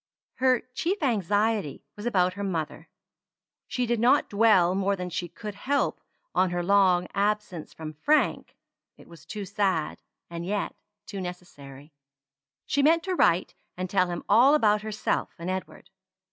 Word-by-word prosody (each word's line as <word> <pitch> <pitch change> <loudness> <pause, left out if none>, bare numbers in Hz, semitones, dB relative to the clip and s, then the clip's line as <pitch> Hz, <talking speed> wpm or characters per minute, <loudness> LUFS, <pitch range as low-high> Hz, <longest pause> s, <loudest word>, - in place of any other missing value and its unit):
Her 255 -1 +3
chief 355 +6 -1
anxiety 210 - 0
was 210 +3 -5
about 185 -5 +2
her 200 +2 -5
mother. 165 -6 -4 0.8
She 250 - -1
did 240 -1 0
not 255 +5 +3
dwell 200 -5 +4
more 195 +1 +1
than 180 -1 -5
she 175 0 -3
could 210 +4 -8
help 275 +8 -1 0.3
on 185 - +2
her 175 0 -2
long 185 -2 +3
absence 205 -5 -1
from 155 -1 -8
Frank; 295 - +1 0.4
it - - -17
was 165 -1 -15
too 205 +1 -5
sad, 190 -5 -1 0.3
and 170 0 -6
yet 200 +3 -2 0.3
too 200 -2 -6
necessary. 150 -5 -10 0.7
She 285 - +1
meant 330 +3 +4
to 375 - -2
write 175 - +2 0.2
and 185 0 -3
tell 185 -3 +3
him 175 -1 -5
all 245 +9 +6
about 210 -7 +3
herself 215 0 -2
and 170 +2 -4
Edward. 190 0 -7
200 Hz, 155 wpm, -26 LUFS, 175-220 Hz, 0.8 s, all